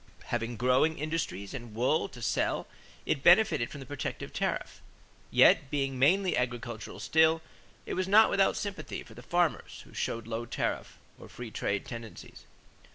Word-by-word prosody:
Having 120 0 -2
growing 130 +7 +3
industries 150 - -3
and 120 -5 -8
wool 130 +7 +1
to 120 - -10
sell - - 0 0.4
it 140 - 0
benefited 170 - +5
from 140 - -9
the - - -8
protective 145 +2 -5
tariff. - - -3 0.5
Yet 140 - +5
being 135 -2 -1
mainly 180 +7 +3
agricultural 120 -2 -3
still, 160 0 +3 0.4
it - - -4
was 185 0 -1
not 215 +3 +6
without 195 -1 +3
sympathy 200 -1 -5
for 110 - -15
the 120 - -11
farmers 175 +5 -1
who - - -18
showed 115 -1 -3
low 115 +1 -4
tariff - - -3 0.2
or - - -12
free 120 -2 -8
trade 100 -1 -2
tendencies. 115 -3 -9
130 Hz, 160 wpm, -30 LUFS, 120-160 Hz, 0.5 s, not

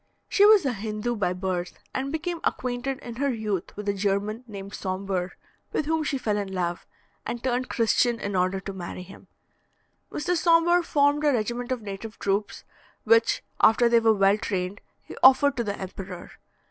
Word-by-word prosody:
She 405 - +4
was 420 -6 +6
a 260 - +1
Hindoo 215 +3 -3
by 190 -5 0
birth, 180 -1 -3 0.2
and 270 +1 -2
became 335 +2 -3
acquainted 250 +2 -2
in 235 -1 -8
her 280 +1 +1
youth 210 -7 -3
with 210 0 -6
a 200 - +2
German 200 +3 -1
named 200 -2 -8
Sombre, 185 -1 -3 0.4
with 310 - 0
whom 320 +1 0
she 285 -2 -1
fell 215 -5 -1
in 200 -2 -3
love, 175 -2 -3 0.4
and 240 - -5
turned 255 0 -1
Christian 235 +1 +2
in 200 -1 -3
order 185 +1 +1
to 195 0 -6
marry 180 -1 -7
him. 190 +2 -14 0.8
Mr. 355 +4 -1
Sombre 340 +1 +4
formed 290 -2 +2
a 295 - +4
regiment 240 +1 -2
of 250 -4 -2
native 205 +2 -7
troops, 200 +1 -2 0.4
which, 460 0 +3 0.2
after 230 +2 +5
they 235 0 +5
were 225 -1 +4
well 195 +1 +3
trained, 190 0 -3 0.2
he - - -10
offered 270 +2 +6
to 235 - 0
the 205 -2 -3
emperor. 185 -1 -8
220 Hz, 180 wpm, -26 LUFS, 195-265 Hz, 0.8 s, was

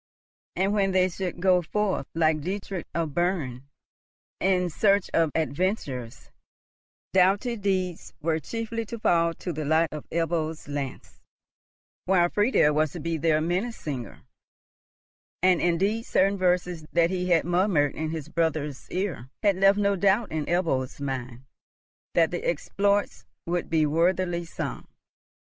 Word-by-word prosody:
And, 195 +2 +1
when 195 -2 +1
they 185 0 +3
should 180 0 -4
go 180 0 +4
forth, 190 -3 -1
like 155 -2 +2
Dietrich 190 +1 -4
of 165 -3 -1
Berne, 145 -7 -1 0.7
in 180 -2 +1
search 200 +3 +2
of 165 -1 +3
adventures, 150 - -2 0.8
doughty 195 +6 +3
deeds 190 -4 -2
were 160 0 0
chiefly 230 +7 -4
to 235 - -6
fall 170 -5 +2
to 175 - -5
the 155 0 -4
lot 160 +2 +2
of 150 -1 -8
Ebbo's 165 -2 -2
lance; 145 -2 -6 0.8
while 175 -2 +3
Friedel 205 - +3
was 155 -1 +1
to 175 - -6
be 165 +1 -2
their 155 0 +2
Minnesinger; 170 - -3 1.2
and 185 -2 +4
indeed 195 +6 +1
certain 195 +2 +3
verses, 180 -3 0
that 170 0 +3
he 180 -1 -2
had 165 -3 +3
murmured 175 -5 +2
in 155 0 -3
his 155 -2 -5
brother's 155 -4 -2
ear, 175 -9 -3
had 200 -3 +3
left 195 +1 +5
no 200 -1 +2
doubt 200 +4 +2
in 155 -2 -2
Ebbo's 160 -8 0
mind 130 -3 -5 0.7
that 165 -2 +4
the 175 - -3
exploits 200 +5 0 0.2
would 175 0 -2
be 155 -1 +3
worthily 175 +2 +1
sung. - - -5
175 Hz, 140 wpm, -26 LUFS, 155-190 Hz, 1.2 s, left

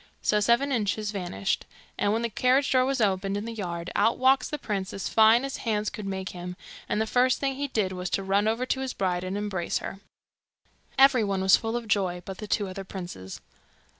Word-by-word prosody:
So 210 - +3
Seven 235 +6 +2
Inches 215 -3 0
vanished; 195 0 -2 0.3
and 205 - +1
when 225 +2 0
the 235 - 0
carriage 255 +6 +2
door 255 -1 +4
was 270 0 0
opened 195 -1 +1
in 205 - -4
the 230 - -5
yard, 175 -5 -5
out 220 +3 +3
walks 260 0 +3
the 300 - -3
prince 195 -7 -3
as 195 - -4
fine 225 +3 +5
as 275 - -4
hands 215 -2 -1
could 210 -2 -6
make 190 -1 -3
him, 180 0 -7 0.3
and - - 0
the 220 - +1
first 250 +3 +3
thing 275 -1 0
he 285 +2 -3
did 215 -7 0
was 180 -1 -4
to 195 - -5
run 200 +2 +2
over 230 +3 0
to 265 - -1
his 265 -1 -3
bride 180 -2 -1
and 185 +2 -3
embrace 205 -4 -2
her. 195 - -6 1.0
Every 270 -3 +6
one 195 -2 -1
was 190 - +7
full 225 0 -2
of 235 -2 -6
joy 185 -4 0
but 190 -1 -7
the 215 - -6
two 205 -1 0
other 190 +1 -6
princes. 175 - -8
210 Hz, 225 wpm, -27 LUFS, 190-240 Hz, 1.0 s, was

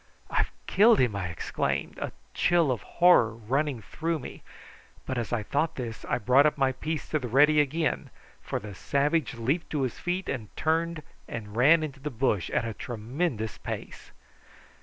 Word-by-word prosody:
"I've - - +1 0.2
killed 220 +4 +5
him!" 120 -5 +2
I 95 -3 -2
exclaimed, 85 -2 -2
a - - -3 0.2
chill 170 -5 +3
of 120 - -2
horror 170 -11 +4
running 130 +2 -1
through 165 - -2
me; 135 - -9 0.6
but 130 -2 -2
as 115 - -4
I 110 - 0
thought 155 +8 0
this 115 -4 -6
I - - 0
brought 135 +6 +4
my 135 -1 +3
piece 155 +4 -4
to 155 - +1
the 125 - -4
ready 150 +5 +5
again, 155 +3 -1 0.3
for - - -3
the 105 0 -8
savage 140 - 0
leaped 135 +9 -1
to 145 -3 +1
his 125 - -3
feet 180 +2 -2
and 115 -6 -4
turned 165 0 0 0.2
and 105 -2 -7
ran 155 +7 +5
into 140 -3 -6
the 150 +2 -4
bush 115 - 0
at - - 0
a 115 - -3
tremendous 115 - -3
pace. - - -7
135 Hz, 175 wpm, -28 LUFS, 115-155 Hz, 0.6 s, killed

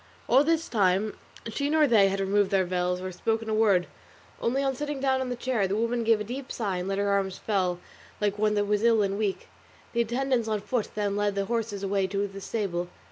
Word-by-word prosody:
All 265 +4 +5
this 325 +1 +1
time 200 -1 +2 0.3
neither 225 - -5
she 285 0 0
nor 310 0 +4
they 220 -7 +5
had 195 0 -2
removed 195 0 +2
their 195 -2 +2
veils 180 0 -1
or 185 0 -5
spoken 225 +4 -2
a - - 0
word, 205 -5 +3 0.6
only 265 +4 +1
on 270 -1 +1
sitting 295 +1 -4
down 265 -1 +1
on 260 - -3
the 245 - -2
chair 240 -5 0
the 195 - -1
woman 230 +2 0
gave 225 -1 +3
a - - -2
deep 255 +5 -6
sigh 200 -6 -2
and 180 +1 -3
let 195 0 -1
her 200 0 +1
arms 195 -1 0
fall 185 -4 0 0.4
like 205 0 0
one 210 0 +2
that 205 0 +1
was 210 0 +1
ill 225 -2 +4
and 200 +1 -1
weak. 205 -3 -2 0.5
The 235 - +2
attendants 240 0 0
on 215 -2 -1
foot 230 +1 -2
then 205 -1 -1
led 205 -1 0
the 200 0 0
horses 225 -3 -2
away 195 -1 +1
to 200 +1 -1
the 195 0 -10
stable. 185 -5 -2
210 Hz, 240 wpm, -27 LUFS, 195-235 Hz, 0.6 s, All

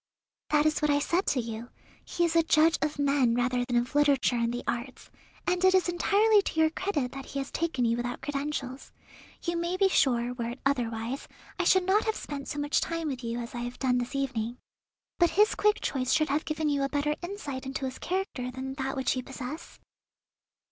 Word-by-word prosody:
"That 300 0 +3
is 310 0 +2
what 300 - +2
I 290 - +4
said 340 +6 0
to 265 - +2
you; 230 0 -5 0.3
he 345 - 0
is 335 -1 -1
a 335 - +7
judge 320 0 +4
of 305 -1 -1
men 275 -4 +2
rather 245 0 +1
than 245 0 -2
of 240 +3 -1
literature 285 -4 +3
and 235 0 +1
the 245 +1 -4
arts; 240 +2 -4 0.3
and 360 0 0
it 375 0 +6
is 370 - +3
entirely 410 +5 +4
to 325 - -3
your 315 0 +4
credit 315 -9 -1
that 270 -1 -8
he - - -6
has 275 0 -3
taken 320 -7 0
you 230 0 +2
without 245 0 -3
credentials. 275 -2 -4 0.5
You 340 0 -1
may 340 +2 -1
be 390 0 +4
sure, 245 -7 +2
were 235 -2 -3
it 245 +2 -7
otherwise, 240 -1 -1 0.3
I 360 - +1
should 375 +1 +5
not 405 +4 +3
have 440 -1 0
spent 280 -2 -6
so - - -4
much 290 0 +1
time 330 -2 -2
with 260 -2 -5
you 230 0 -3
as 235 -1 -6
I 240 - -4
have 245 +1 -5
done 250 -2 +1
this 245 +3 -4
evening. 245 -4 -2 0.6
But 345 -1 +5
his 420 +1 +5
quick 420 0 +2
choice 260 -2 -1
should 310 -1 +3
have 290 +3 0
given 310 0 -1
you 285 -1 +1
a 275 - 0
better 295 +1 0
insight 320 -9 -5
into 265 0 -3
his 260 0 -5
character 360 -9 -2
than 260 +1 -5
that 270 +1 -2
which 265 -1 0
you 255 - -2
possess?" 270 +4 -8
280 Hz, 220 wpm, -28 LUFS, 250-330 Hz, 0.6 s, a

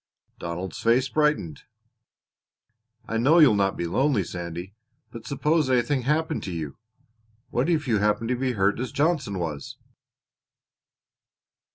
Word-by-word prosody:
Donald's 85 +1 -5
face 125 +3 +2
brightened. 150 - 0 1.5
"I 115 - -2
know 140 +9 +4
you'll 150 -9 +7
not 100 -1 +1
be 85 - -2
lonely, 130 - +1
Sandy," 85 -1 -5
he 90 - -10
said, 100 - -35 0.4
"but 115 -1 -10
suppose 150 +1 +1
anything 130 +2 +2
happened 155 +4 0
to 95 - -4
you 80 -4 -5 0.8
what 130 +7 0
if 155 -4 +1
you 110 -4 +2
happened 105 +3 +1
to 125 - +1
be 130 0 -1
hurt 100 0 +1
as 130 - -3
Johnson 140 - 0
was?" 80 -5 -5
115 Hz, 145 wpm, -25 LUFS, 95-145 Hz, 1.5 s, you'll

